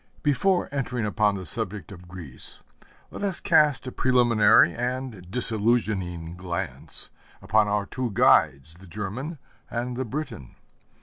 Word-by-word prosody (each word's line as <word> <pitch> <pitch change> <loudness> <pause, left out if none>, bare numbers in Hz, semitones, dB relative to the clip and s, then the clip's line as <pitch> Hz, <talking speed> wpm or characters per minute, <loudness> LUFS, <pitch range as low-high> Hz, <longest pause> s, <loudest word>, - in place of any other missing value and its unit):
Before 175 +6 +2
entering 125 -5 -2
upon 105 -1 +1
the 95 -2 -6
subject 95 +4 0
of 90 -3 -12
Greece, 85 -8 -9 0.5
let - - -8
us 195 -3 0
cast 150 -5 +3
a 130 - -5
preliminary 120 -9 +4
and 125 -6 -4
disillusioning 105 -7 0
glance 90 0 -3 0.3
upon 110 0 +2
our 105 0 0
two 125 +4 -3
guides, 80 -5 +3
the 95 +1 -15
German 105 - -5 0.3
and 120 +1 -3
the 130 - -2
Briton. 125 - -6
110 Hz, 130 wpm, -25 LUFS, 95-125 Hz, 0.5 s, preliminary